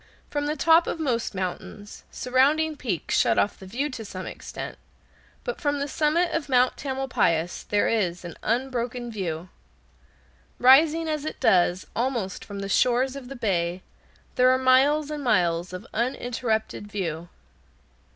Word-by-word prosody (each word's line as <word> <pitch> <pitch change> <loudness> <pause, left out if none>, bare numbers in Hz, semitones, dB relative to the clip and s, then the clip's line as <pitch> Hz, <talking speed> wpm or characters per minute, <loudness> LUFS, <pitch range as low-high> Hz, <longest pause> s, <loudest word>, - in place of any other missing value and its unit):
From 290 0 -1
the 300 - -1
top 325 +3 +4
of - - -3
most 240 -8 -1
mountains 190 +2 -6
surrounding 290 +5 +2
peaks 220 - -2
shut - - +3
off 205 - +1
the 190 - -11
view 255 +9 -2
to 235 -3 -6
some 185 -3 -7
extent, - - -7 0.6
but - - -5
from 290 -2 +1
the 280 - -2
summit 310 +5 +1
of 305 -3 -2
Mount 250 -1 +3
Tamalpais 260 - -1
there 205 0 +2
is 180 -6 -1
an 170 - -6
unbroken 240 0 -2
view. 180 -4 -4 1.1
Rising 305 +6 +5
as 305 -2 -2
it 310 - -5
does 180 0 +3
almost 235 -6 -2
from 200 -1 -7
the 195 - -4
shores 250 +6 +2
of 265 -3 -8
the 275 - -7
bay, 185 -6 -1 0.5
there 250 0 +6
are 255 - +4
miles 275 +4 +3
and 295 -1 -4
miles 175 -6 +1
of 180 0 -7
uninterrupted 230 -3 -2
view. 170 -4 -4
245 Hz, 150 wpm, -25 LUFS, 195-280 Hz, 1.1 s, there